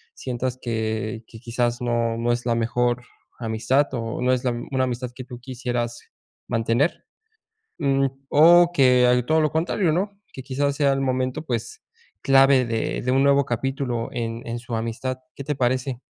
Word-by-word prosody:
sientas 125 0 -3
que 110 -1 -3
que 110 - -12
quizás 120 +1 -1
no 120 -1 0
no 120 +1 0
es 120 0 -4
la 120 -1 +1
mejor 120 +1 0 0.4
amistad 115 +5 +1
o 115 -1 -3
no 125 +1 +2
es 125 - -1
la 125 - +2 0.2
una 130 -1 +1
amistad 125 0 -4
que 130 -1 -8
tú 125 -2 -9
quisieras 120 -2 -3 0.5
mantener, 115 +6 +1 0.8
mm, 135 -3 +2 0.2
o 170 +3 +7
que 125 -5 +5
hay 125 0 +3
todo 160 +4 +2
lo 155 - +2
contrario, 165 +2 +1
no 200 +4 -2
que 130 - -8
quizás 140 +2 -1
sea 140 -2 +3
el 135 - -2
momento, 130 0 -1
pues, 160 - -4 0.4
clave 135 -1 +5
de 115 -1 -2
de 125 +1 0
un 135 +1 +3
nuevo 140 0 +4
capítulo 120 -1 -2
en 115 -1 -3
en 120 0 -3
su 120 0 -6
amistad, 115 +3 -3 0.2
¿qué 140 - -7
te 150 +2 -1
parece? 130 0 0
125 Hz, 175 wpm, -23 LUFS, 120-135 Hz, 0.8 s, o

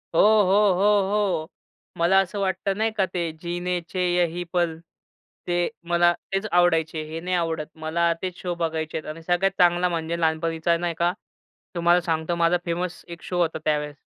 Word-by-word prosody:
हो, - - +4
हो, 205 -2 +5
हो, 205 +3 +3
हो. 190 -7 0 0.5
मला 175 +3 +4
असं 195 +2 -1
वाटतं 195 0 -1
नाही 220 +1 +1
का 195 - +3
ते 170 -2 -1
जिनेचे 175 +1 -3 0.2
यही 175 0 0
पल 170 -2 +1 0.7
ते 175 0 +1 0.2
मला 175 0 +4 0.2
तेच 195 +2 0
आवडायचे. 165 -3 +2
हे 155 +1 -6
नाही 180 +2 -2
आवडत. 165 -3 -1
मला 165 +2 0
तेच 185 -1 -4
शो 175 -1 -3
बघायचे 160 -2 -2
आहेत 155 - -7
आणि 165 +1 -11
सगळ्यात 175 +3 +1
चांगला 175 0 +4
म्हणजे 170 0 -2
लहानपणीचा 165 +1 +1
नाही 170 0 -2
का 175 +1 +2 0.6
तुम्हाला 175 +1 +3
सांगतो 165 0 -1
माझा 170 +1 +3
फेमस 170 +1 -3
एक 170 -1 -9
शो 180 -1 -1
होता 165 -2 0
त्यावेळेस. 150 -1 -1
175 Hz, 170 wpm, -24 LUFS, 165-180 Hz, 0.7 s, हो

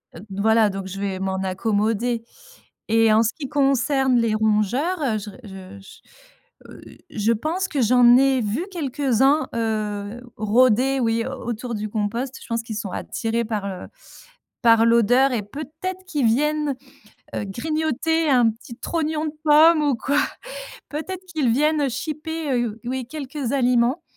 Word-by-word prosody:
Heu, - - -9
voilà 215 +2 +3
donc 195 -1 -5
je 195 +1 -7
vais 195 -2 -3
m'en 190 0 -2
accommoder 220 +4 0 0.7
et 225 -1 +4
en 225 +1 +5
ce 225 - 0
qui 280 -5 -6
concerne 270 -2 +2
les 230 -2 +1
rongeurs, 220 - +1
heu, 230 -6 0
je 205 +1 -8
re - - -15
je 190 -1 -10
je, 485 - -20
heu, - - -12 0.3
je 220 -1 0
pense 330 - -2
que 280 -4 -1
j'en 245 +1 +6
ai 265 -1 +3
vu 225 - -2
quelques-uns, 275 - +1
heu, 215 0 -3 0.2
rôder, 250 +4 +3
oui, 230 0 +1
au 260 -3 -6
autour 240 +1 -4
du 210 +1 -3
compost. 230 +5 -3
Je - - -11
pense 230 -1 -2
qu'ils 220 -2 -6
sont 205 -3 -4
attirés 230 0 -2
par, 210 -3 -3
heu, 190 -2 -6 0.8
par 230 -1 +6
l'odeur 245 +4 +4
et 225 - 0
peut-être 315 - -7
qu'ils 295 -8 0
viennent, 295 +4 +1 0.6
heu, 205 - -3
grignoter 315 +7 -1
un 245 -4 +4
petit 230 +1 -12
trognon 315 -1 -2
de 300 - -5
pomme 310 +1 +6
ou 285 -4 +2
quoi. 285 +5 0 0.7
Peut-être 365 +5 -5
qu'ils 305 -9 0
viennent, 300 +4 +2
heu, 275 - +1
chipper, 305 +3 -4
heu, 230 -2 -3
oui, 255 0 -3
quelques 280 -3 -5
aliments, 250 +1 +2
245 Hz, 160 wpm, -22 LUFS, 220-295 Hz, 0.8 s, j'en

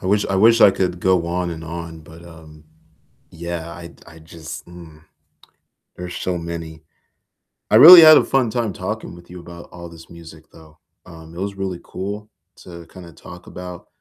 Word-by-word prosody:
I - - -7
wish 100 +1 +1
I 95 - -2
wish 115 +4 +4
I 100 - +7
could 90 -2 -3
go 90 -2 +1
on 90 +1 -3
and 80 -1 -8
on, 85 0 -9
but, 80 +2 -16
um, 80 -2 -16 0.7
yeah, 85 0 -7
I 85 0 -12
I 80 +1 -16
just 80 0 -11
mm. 85 -3 -15 0.9
There's 90 0 -8
so 90 -1 -4
many. 85 -2 -8 0.9
I - - +4
really 170 +9 +11
had 155 -1 +8
a - - +3
fun 130 -4 0
time 115 -2 -3
talking 95 0 -7
with 85 0 -17
you 90 0 -11
about 85 0 -13
all 85 0 -11
this 80 -1 -16
music 85 -1 -15
though. 80 -1 -19 0.3
Um, 80 -2 -14
it - - -9
was 100 0 -5
really 95 -2 -5
cool 105 +2 -8 0.3
to 85 -2 -13
kinda 85 -1 -14
talk 90 +3 -14
about 90 -1 -11
85 Hz, 185 wpm, -19 LUFS, 80-95 Hz, 0.9 s, really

